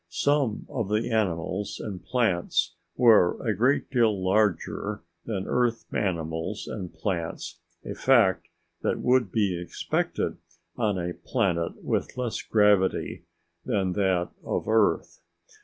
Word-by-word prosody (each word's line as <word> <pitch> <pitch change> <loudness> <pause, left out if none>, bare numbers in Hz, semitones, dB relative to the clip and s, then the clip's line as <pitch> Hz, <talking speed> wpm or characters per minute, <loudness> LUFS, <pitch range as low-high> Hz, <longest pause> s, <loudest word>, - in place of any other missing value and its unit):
Some 140 - +1
of 115 -7 -3
the 110 +3 0
animals 95 -2 -1
and 95 -4 -6
plants 110 -9 +1 0.2
were 115 -8 +5
a 110 - +3
great 130 +9 +1
deal 110 -7 +2
larger 105 0 0 0.2
than 100 -4 -3
Earth 120 -2 0
animals 80 -4 -2
and 90 -2 -5
plants, 85 -5 -4 0.3
a - - -4
fact - - +3 0.3
that - - 0
would 125 -5 +2
be 100 -5 +1
expected 90 - -2 0.4
on 105 -5 0
a 90 0 -2
planet 90 -10 -1
with - - -2
less 125 -3 -2
gravity 105 -3 +2 0.4
than 95 -3 0
that 95 -3 +1
of - - -2
Earth. 110 - +1
105 Hz, 125 wpm, -26 LUFS, 90-115 Hz, 0.4 s, were